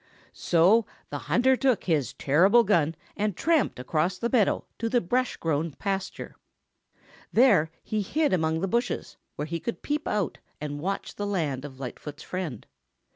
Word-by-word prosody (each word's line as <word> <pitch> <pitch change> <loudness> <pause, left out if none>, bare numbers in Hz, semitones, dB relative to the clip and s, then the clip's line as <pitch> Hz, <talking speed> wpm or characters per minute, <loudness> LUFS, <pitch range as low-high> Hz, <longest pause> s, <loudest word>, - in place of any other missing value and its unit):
So 185 +7 +3 0.2
the - - -3
hunter 260 +2 +4
took 255 -4 +1
his 150 -9 0
terrible 190 - +4
gun 165 -6 +2 0.2
and 210 -3 -1
tramped 325 -3 +2
across 160 +8 0
the 235 +4 -2
meadow 225 -6 +2
to 230 - -1
the 245 - +3
brush 250 +7 0
grown 160 -1 -1
pasture. 195 +5 -4 1.0
There 205 -11 +5
he 215 -1 -1
hid 295 +6 +1
among 160 -2 +1
the 195 - 0
bushes 235 +5 -2 0.2
where 150 - -3
he 165 +2 -3
could 235 - -5
peep 300 +1 -2
out 205 -7 -1 0.2
and 145 -1 -4
watch 195 +4 -3
the 205 - -2
land 150 -9 -1
of 135 -2 -10
Lightfoot's 145 +3 -7
friend. 175 - -5
185 Hz, 160 wpm, -27 LUFS, 155-230 Hz, 1.0 s, There